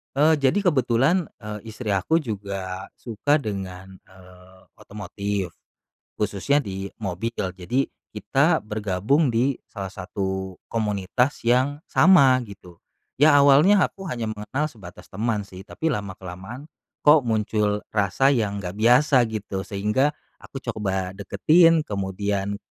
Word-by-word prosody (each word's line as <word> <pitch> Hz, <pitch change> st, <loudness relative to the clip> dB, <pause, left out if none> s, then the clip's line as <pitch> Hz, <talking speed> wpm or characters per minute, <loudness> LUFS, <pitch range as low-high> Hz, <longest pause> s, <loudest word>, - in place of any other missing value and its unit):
Eee, 150 Hz, +2 st, +4 dB
jadi 205 Hz, -, +2 dB
kebetulan, 135 Hz, +6 st, +2 dB
eee, 105 Hz, -1 st, -6 dB
istri 110 Hz, 0 st, -4 dB
aku 100 Hz, -, +1 dB
juga 100 Hz, -5 st, -5 dB
suka 120 Hz, +5 st, 0 dB
dengan, 95 Hz, -3 st, -6 dB
eee, 95 Hz, 0 st, -18 dB, 0.2 s
otomotif, 100 Hz, -2 st, -4 dB, 0.7 s
khususnya 105 Hz, +8 st, +1 dB
di 95 Hz, -5 st, -6 dB
mobil. 100 Hz, +3 st, -3 dB, 0.2 s
Jadi 120 Hz, +9 st, -1 dB, 0.2 s
kita 135 Hz, -, +1 dB
bergabung 105 Hz, -, 0 dB
di 125 Hz, +4 st, +1 dB
salah 95 Hz, -2 st, -7 dB
satu 95 Hz, -1 st, -4 dB
komunitas 110 Hz, +4 st, -1 dB
yang 130 Hz, +4 st, +2 dB
sama 135 Hz, -9 st, +5 dB
gitu. 95 Hz, -5 st, -14 dB, 0.4 s
Ya 150 Hz, +1 st, +6 dB
awalnya 145 Hz, +8 st, +6 dB
aku 195 Hz, -1 st, -9 dB
hanya 115 Hz, -5 st, -3 dB
mengenal 110 Hz, +7 st, -3 dB
sebatas 95 Hz, -9 st, -13 dB
teman 110 Hz, +1 st, -1 dB
sih, 95 Hz, -1 st, -11 dB
tapi 160 Hz, -, -3 dB
lama 105 Hz, -9 st, -3 dB
kelamaan 95 Hz, +9 st, -9 dB, 0.4 s
kok 150 Hz, -2 st, +6 dB
muncul 105 Hz, -2 st, 0 dB
rasa 105 Hz, +6 st, +2 dB
yang 105 Hz, -7 st, 0 dB
nggak 90 Hz, 0 st, -6 dB
biasa 125 Hz, +4 st, +5 dB
gitu, 100 Hz, -3 st, -4 dB
sehingga 105 Hz, +8 st, 0 dB, 0.3 s
aku 135 Hz, -, -8 dB
coba 95 Hz, -4 st, -2 dB
deketin 160 Hz, -, +4 dB
kemudian, 100 Hz, 0 st, -2 dB
105 Hz, 125 wpm, -23 LUFS, 95-135 Hz, 0.7 s, Ya